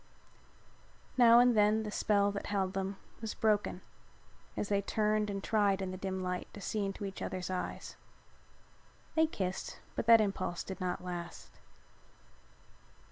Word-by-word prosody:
Now 235 -2 +7
and 245 0 +6
then 215 +1 +4
the 210 - -5
spell 205 -1 +2
that 200 - -5
held 190 -2 0
them 195 0 -3 0.2
was 225 -2 -4
broken 210 -4 +1 0.8
and - - 0
they 200 0 +1
turned 215 +1 +1
and 195 -1 -4
tried 205 -3 +2
in 190 -1 -3
the - - -5
dim 190 0 -3
light 180 0 -3
to - - -8
see 205 +2 -2
into 195 +1 -3
each 195 -1 -6
other's 185 0 -3
eyes. 185 - -4 1.2
They 320 0 +4
kissed 190 -10 -4 0.2
but - - -3
that 230 -1 +9
impulse 195 -4 -1
did 190 - -7
not 180 -1 -2
last. 175 -1 -6
200 Hz, 150 wpm, -33 LUFS, 190-215 Hz, 1.2 s, that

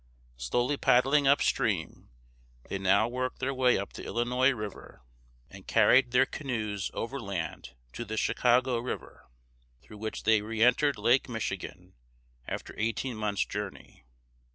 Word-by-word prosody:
Slowly 120 - 0
paddling 135 +4 +3
upstream, 140 +1 +1 0.6
they 100 - -4
now 100 +3 +3
worked 130 +1 -3
their 135 +1 -2
way 130 -1 +3
up 100 - -5
the - - -8
Illinois 125 +2 +1
River, 105 - -6 0.4
and - - -14
carried 130 -1 +5
their 125 +2 +4
canoes 110 -9 -3
overland 100 - -5 0.2
to - - -5
the 110 -1 -5
Chicago 125 +2 +2
(she - - -4
caw´go) - - -10
River, 125 - -7 0.5
through 105 - -13
which 110 0 -5
they 110 -1 +4
reëntered 120 +6 +2
Lake 125 +2 +2
Michigan, 115 -3 -5 0.5
after - - -5
eighteen 115 +3 -1
months' 105 -2 -1
journey. 105 -9 -7
120 Hz, 135 wpm, -29 LUFS, 105-130 Hz, 0.6 s, carried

